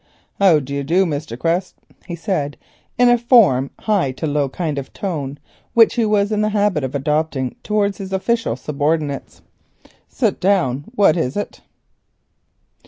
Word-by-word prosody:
"How 190 -5 +6
do 140 -1 -5
you 140 0 -2
do, 175 +7 +2 0.3
Quest?" 170 +6 -1 0.3
he 175 - -4
said, 165 -5 -2 0.4
in 245 0 +5
a 240 0 +4
from 210 - +4
high 200 -11 +1
to 145 - -5
low 145 -2 0
tone, 145 0 -4 0.4
which 230 -1 +6
he 235 -2 +1
was 205 0 +1
in 210 0 +1
the 215 - +1
habit 205 -7 +1
of 130 +1 -4
adopting 150 -2 -1
towards 205 -1 0
his 195 -1 -6
official 230 +4 0
subordinates. 150 -1 -2 0.7
"Sit - - 0
down. 150 -9 +1
What 200 -8 +4
is 140 -2 -1
it?" 205 - -5
170 Hz, 145 wpm, -19 LUFS, 140-205 Hz, 0.7 s, How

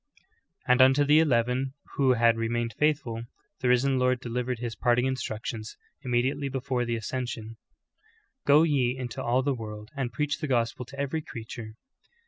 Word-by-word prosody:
"' - - -36
And 125 +1 +5
unto 135 +2 +6
the 150 +2 +5
eleven 130 -2 +1 0.2
who 135 -2 +4
had 115 -1 +4
remained 115 0 -1
faithful, 140 -5 0 0.4
the 125 - -1
Risen 130 +2 +3
Lord 125 0 +2
delivered 125 0 -3
His 115 -1 -4
parting 120 +3 +2
instructions, 110 -4 -4 0.2
immediately 130 +3 0
before 130 -2 -1
the 120 0 -1
ascension: 115 -1 -4 0.9
"Go 145 +2 +7
ye 130 -5 +1
in 125 -2 -4
to - - -5
all 125 +2 +2
the 140 0 +1
world 105 -3 -7
and 130 -3 -2
j)reacli 145 +5 -1
the 155 - -3
gospel 120 -1 0
to 140 +3 -11
every 140 +3 -1
creature." 115 -4 -8
125 Hz, 165 wpm, -27 LUFS, 115-135 Hz, 0.9 s, Go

